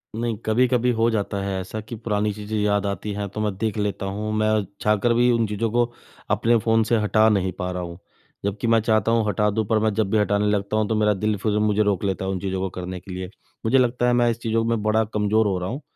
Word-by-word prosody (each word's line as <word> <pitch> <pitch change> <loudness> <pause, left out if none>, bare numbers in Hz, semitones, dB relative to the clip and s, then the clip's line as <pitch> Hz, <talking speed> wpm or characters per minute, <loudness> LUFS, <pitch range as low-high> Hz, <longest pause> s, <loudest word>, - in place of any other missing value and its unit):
नहीं 115 -1 -2
कभी-कभी 125 +2 +2
हो 115 +1 +4
जाता 100 -2 -2
है 100 -1 -2
ऐसा 95 +4 -6
कि 110 +3 -8
पुरानी 105 -1 -1
चीज़ें 105 +1 -5
याद 105 -1 +1
आती 100 +1 -3
हैं, 100 0 -3
तो 105 - -7
मैं 105 -2 -1
देख 110 0 -2
लेता 105 -1 -2
हूँ। 105 +2 -3
मैं 110 0 +2 0.3
चाह 105 0 +3
कर 120 -1 +4
भी 120 +1 +3
उन 115 -1 +2
चीज़ों 105 +2 -1
को 120 +1 +3 0.5
अपने 115 +1 +3
फ़ोन 115 0 +2
से 115 +1 +1
हटा 110 +1 +3
नहीं 95 -3 +1
पा 90 - -2
रहा 90 0 -4
हूँ। 85 0 -8 0.5
जबकि 100 +3 -2
मैं 115 0 +4
चाहता 110 +1 +2
हूँ 115 -2 +2
हटा 105 +1 +1
दूँ 110 +1 -1
पर 110 - +2
मैं 110 -1 +1
जब 105 -2 0
भी 110 - +3
हटाने 105 0 +1
लगता 105 +1 0
हूँ 110 -1 +1
तो, 110 - +1
मेरा 105 -1 +3
दिल 105 +1 -1
फिर 105 +1 0
मुझे 105 0 +2
रोक 100 -3 0
लेता 95 -1 -1
है 95 - -1
उन 95 - -2
चीज़ों 95 0 -3
को 95 - -1
करने 90 0 -5
के 95 - -12
लिए। 90 0 -5 0.4
मुझे 120 +4 +4
लगता 125 -1 +2
है 125 - +3
मैं 120 -1 +3
इस 115 - -5
चीज़ों 115 0 0
में 115 -2 0
बड़ा 110 +1 +2
कमज़ोर 105 +1 +2
हो 95 -2 0
रहा 90 +1 -3
हूँ, 135 +7 -5
105 Hz, 265 wpm, -23 LUFS, 100-115 Hz, 0.5 s, हो